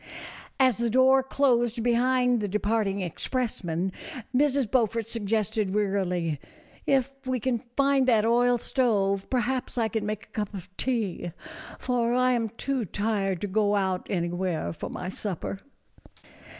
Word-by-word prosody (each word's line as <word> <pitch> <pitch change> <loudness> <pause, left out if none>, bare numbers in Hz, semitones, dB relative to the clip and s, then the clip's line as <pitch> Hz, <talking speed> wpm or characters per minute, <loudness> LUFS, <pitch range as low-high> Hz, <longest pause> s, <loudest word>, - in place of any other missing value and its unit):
As 255 -4 +4
the 235 0 +1
door 260 +3 +5
closed 240 -4 +1
behind 250 +1 +3
the 205 - -1
departing 205 0 0
express 235 - -3
men, 175 +3 -1 0.4
Mrs. 280 0 +3
Beaufort 230 -2 +2
suggested, 215 -2 -1
wearily, 180 -7 0 0.2
" - - -27
If 265 +1 -2
we 255 -1 0
can 240 0 0 0.2
find 275 -1 +3
that 225 -4 +4
oil 245 +1 +4
stove, 200 -6 0
perhaps 255 0 -1
I 225 -2 +2
can 220 0 -2
make 215 0 -4
a - - -33
cup 210 -3 -3
of 185 0 -9
tea, 210 -9 -2 0.4
for 240 -1 0
I 255 0 +3
am 230 -3 0
too 255 +3 -2
tired 200 -2 -1
to 205 - -1
go 205 +1 +2
out 190 -2 0
anywhere 175 -2 -1
for - - -6
my 180 - -5
supper." 195 0 -4
225 Hz, 150 wpm, -27 LUFS, 195-250 Hz, 0.4 s, door